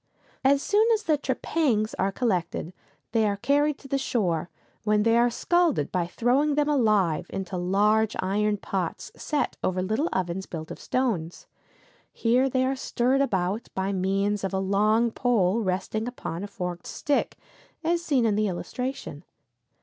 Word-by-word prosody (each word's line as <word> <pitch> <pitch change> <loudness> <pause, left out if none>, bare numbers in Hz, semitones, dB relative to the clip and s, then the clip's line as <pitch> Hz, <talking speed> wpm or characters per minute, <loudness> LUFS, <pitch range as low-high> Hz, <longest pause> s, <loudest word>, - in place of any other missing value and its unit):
] - - -33
As 280 - -1
soon 425 +2 +3
as 430 - -5
the 310 - +3
trepangs 260 -5 0
are 195 +1 +1
collected 185 -6 -1 0.4
they 220 -1 +2
are 200 -1 -1
carried 290 +5 +2
to 275 - -13
the 275 0 0
shore, 175 -10 -1 0.3
when 210 0 +2
they 230 +1 +3
are 240 +1 +4
scalded 330 - +1
by 175 -2 0
throwing 265 +9 +1
them 295 0 +2
alive 210 - +2
into 190 -1 -5
large 205 +4 +2
iron 205 +2 0
pots 190 -3 -4
set 300 -2 -2
over 185 0 0
little 220 - 0
ovens 185 +1 -2
built 160 -2 -7
of - - -8
stones. 205 -11 -2 0.7
Here 250 +3 +2
they 260 0 +1
are 265 +1 0
stirred 260 +1 +1
about 200 -3 -1
by 190 +1 -1
means 195 +2 0
of 195 0 -2
a - - +1
long 215 +4 +2
pole 225 -5 +2
resting 210 +3 -2
upon 190 -8 -5
a - - -4
forked 180 -3 -5
stick, 290 -1 -1 0.5
as 340 +1 +1
seen 270 -7 +2
in 220 - +3
the 210 +1 +1
illustration. 200 - -5
215 Hz, 165 wpm, -26 LUFS, 190-260 Hz, 0.7 s, are